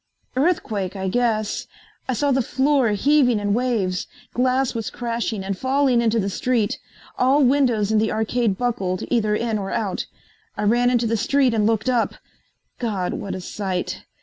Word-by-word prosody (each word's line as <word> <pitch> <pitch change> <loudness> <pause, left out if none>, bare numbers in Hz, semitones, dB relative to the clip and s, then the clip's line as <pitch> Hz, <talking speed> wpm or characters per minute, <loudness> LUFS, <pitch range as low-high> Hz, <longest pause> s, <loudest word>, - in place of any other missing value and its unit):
"Earthquake, 225 - 0
I 190 -1 -3
guess. 215 -1 0 0.4
I - - +2
saw 285 +4 +1
the 265 0 +3
floor 265 0 +2
heaving 250 0 +3
in 205 0 0
waves. 215 -7 0 0.3
Glass 255 +1 +1
was 225 -2 -3
crashing 230 -4 -3
and 195 0 -2
falling 260 +2 +2
into 230 -1 +2
the 195 - -1
street. 225 +1 0 0.4
All 270 +3 +4
windows 245 -6 +2
in 220 - +3
the 220 0 +1
arcade 220 -1 0
buckled, 195 -7 -1
either 215 -4 +2
in 225 -1 -1
or 195 -1 -4
out. 200 -4 -2 0.5
I - - -2
ran 240 +4 +3
into 240 -1 +2
the 230 0 +1
street 270 +2 +2
and 215 -2 +2
looked 220 -1 0
up. 245 -3 +1 0.6
God, 200 -7 -2
what 200 - -4
a 185 - -6
sight! 185 -1 -4
230 Hz, 170 wpm, -22 LUFS, 205-255 Hz, 0.6 s, All